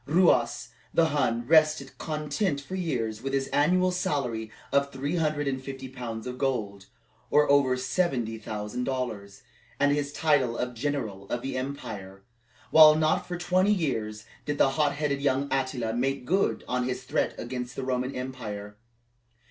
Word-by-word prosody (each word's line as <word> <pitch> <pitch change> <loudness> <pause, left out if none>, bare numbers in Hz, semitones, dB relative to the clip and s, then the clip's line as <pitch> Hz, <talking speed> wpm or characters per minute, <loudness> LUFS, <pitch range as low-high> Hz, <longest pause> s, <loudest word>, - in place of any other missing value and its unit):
Ruas 150 -9 +3 0.2
the 165 -1 +3
Hun 120 -5 0
rested 155 -2 +3
content 150 +1 -1
for 140 +6 -10
years 120 -12 -2
with 135 +1 -4
his 135 0 0
annual 180 +5 +3
salary 125 -11 -2 0.2
of 140 0 +2
three 140 +6 -2
hundred 155 -3 0
and 130 -1 -2
fifty 135 -1 -6
pounds 120 -3 -6
of 125 0 -6
gold, 105 -8 -2 0.4
or 150 0 +4
over 135 -3 +4
seventy 125 -4 -1
thousand 105 +3 -4
dollars, 110 -6 -4 0.4
and 145 0 +4
his 145 0 0
title 145 -7 +2
of 125 0 -2
General 115 -7 -3
of 120 - -2
the 135 -1 -3
Empire; 105 -8 -6 0.5
while 155 -1 +9
not 155 0 +1
for 175 - -3
twenty 185 +3 +2
years 110 - -1 0.2
did 145 0 -2
the 135 - +4
hot 145 +1 +1
headed 145 -2 -1
young 140 0 +1
Attila 130 -4 -1
make 135 +2 -1
good 190 +7 +1 0.2
his 125 0 -3
threat 130 - -1
against 125 +1 -5
the 135 - -4
Roman 130 0 -2
power. 105 -4 -7
135 Hz, 155 wpm, -27 LUFS, 120-150 Hz, 0.5 s, while